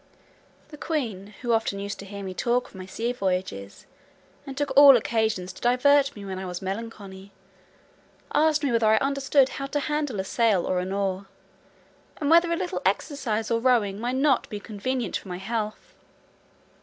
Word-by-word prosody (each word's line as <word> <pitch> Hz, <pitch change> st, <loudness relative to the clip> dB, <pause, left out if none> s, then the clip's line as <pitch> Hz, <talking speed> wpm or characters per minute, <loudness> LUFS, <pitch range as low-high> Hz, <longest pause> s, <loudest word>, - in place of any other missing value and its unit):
The 300 Hz, -, -12 dB
queen, 215 Hz, -, -3 dB
who 240 Hz, -, 0 dB
often 225 Hz, -3 st, 0 dB
used 200 Hz, +1 st, -5 dB
to 200 Hz, -, -9 dB
hear 200 Hz, 0 st, -7 dB
me 190 Hz, -1 st, -5 dB
talk 245 Hz, +5 st, 0 dB
of -, -, -20 dB
my 185 Hz, -1 st, -9 dB
sea 230 Hz, +5 st, -2 dB
voyages, 180 Hz, -, -3 dB, 0.6 s
and 270 Hz, -1 st, -7 dB
took 290 Hz, -1 st, -2 dB
all 280 Hz, -2 st, +9 dB
occasions 220 Hz, -5 st, -1 dB
to -, -, -14 dB
divert 275 Hz, +3 st, +3 dB
me 205 Hz, -2 st, -9 dB
when 190 Hz, -1 st, -5 dB
I 190 Hz, -, -5 dB
was 180 Hz, -1 st, -5 dB
melancholy, 195 Hz, -1 st, -7 dB, 1.0 s
asked 305 Hz, 0 st, +3 dB
me 280 Hz, -, +1 dB
whether 230 Hz, -2 st, +2 dB
I 220 Hz, 0 st, +5 dB
understood 275 Hz, +1 st, +2 dB
how 275 Hz, -, -5 dB
to 290 Hz, +2 st, -1 dB
handle 290 Hz, -6 st, -2 dB
a -, -, 0 dB
sail 210 Hz, -3 st, +1 dB
or 185 Hz, -, 0 dB
an 185 Hz, +1 st, -4 dB
oar, 195 Hz, -1 st, -2 dB, 0.9 s
and 290 Hz, 0 st, -1 dB
whether 340 Hz, +1 st, +5 dB
a -, -, +2 dB
little 370 Hz, 0 st, -3 dB
exercise 230 Hz, -7 st, -1 dB
of 230 Hz, 0 st, 0 dB
rowing 215 Hz, -6 st, +2 dB
might 245 Hz, +3 st, -2 dB
not 275 Hz, +1 st, +2 dB
be 210 Hz, -, -5 dB
convenient 235 Hz, +5 st, -3 dB
for -, -, -13 dB
my 180 Hz, -1 st, -5 dB
health? 215 Hz, +2 st, -4 dB
225 Hz, 180 wpm, -25 LUFS, 195-275 Hz, 1.0 s, all